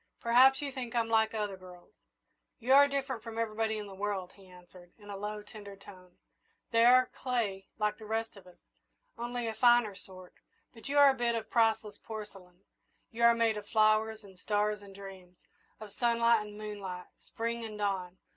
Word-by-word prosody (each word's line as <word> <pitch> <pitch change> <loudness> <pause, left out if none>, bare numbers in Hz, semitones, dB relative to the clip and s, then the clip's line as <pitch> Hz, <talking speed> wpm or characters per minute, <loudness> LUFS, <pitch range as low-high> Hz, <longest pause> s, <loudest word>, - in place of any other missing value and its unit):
"Perhaps 260 +4 +5
you 280 - -3
think 250 -3 -6
I'm 230 -1 +1
like 220 0 +2
other 210 -2 -2
girls!" 180 -1 -15 0.6
"You 255 +2 +1
are 285 +1 +8
different 270 -4 -3
from 225 0 -8
everybody 220 -1 -1
in 210 - -5
the 200 - -10
world," 195 -2 -3
he 195 -1 -18
answered, 180 0 -17
in 205 -2 -12
a - - -5
low, 210 +1 -5
tender 205 -1 -11
tone. 185 -2 -16 0.5
"They 230 0 +4
are 255 +1 +5
clay 220 -7 -2
like 210 0 -1
the 215 - -10
rest 225 +1 -3
of 195 -2 -15
us, 180 - -17 0.6
only 240 0 -4
of 220 - -4
a - - -20
finer 240 -4 +5
sort, 185 -1 -13 0.4
but 230 +3 -8
you 285 - 0
are 285 -1 +8
a - - -2
bit 240 -2 0
of 220 -1 -5
priceless 225 -2 +1
porcelain. 195 -5 -10 0.5
You 230 - -7
are 235 0 +6
made 230 -2 +1
of 205 -1 -8
flowers 215 0 +2
and 190 -2 -16
stars 210 +1 -1
and 200 -1 -13
dreams 190 -2 -12 0.4
of 215 -2 -11
sunlight 235 -2 +2
and 210 0 -11
moonlight, 200 -4 -6 0.2
Spring 230 0 -4
and 215 -2 -7
dawn. 190 -3 -2
215 Hz, 195 wpm, -31 LUFS, 195-235 Hz, 0.6 s, are